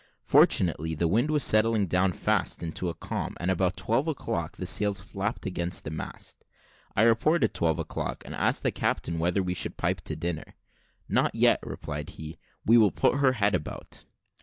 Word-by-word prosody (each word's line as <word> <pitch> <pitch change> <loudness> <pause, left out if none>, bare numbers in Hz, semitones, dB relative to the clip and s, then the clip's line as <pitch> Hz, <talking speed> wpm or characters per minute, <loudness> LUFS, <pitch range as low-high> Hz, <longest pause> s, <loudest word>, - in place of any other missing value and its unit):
Fortunately, 80 -2 +3
the 85 +2 +1
wind 115 - +1
was 150 -3 +2
settling 110 -1 +3
down 90 +1 +2
fast 85 - 0
into 85 +2 -3
a 85 - -5
calm, - - -4
and 90 +2 0
about 95 0 0
twelve 125 +8 0
o'clock 85 - -3
the - - -4
sails 105 -1 +1
flapped 100 +4 -4
against 90 -2 -1
the 75 - -6
mast. 80 - -8 0.5
I 110 - +4
reported 115 +3 +3
twelve 80 -2 +1
o'clock, - - -4
and - - -7
asked - - +1
the - - +1
captain 85 -1 -2
whether 90 +4 +1
we 90 0 -2
should - - -1
pipe - - -1
to - - -1
dinner. 80 -1 -4 0.5
"Not - - +1
yet," - - +4
replied 75 -1 -6
he, 80 +1 -9 0.3
"we 115 +2 +6
will 105 -2 +5
put 135 - +1
her 135 -2 +4
head 105 -4 +1
about." 80 -5 -5
95 Hz, 185 wpm, -27 LUFS, 85-110 Hz, 0.5 s, we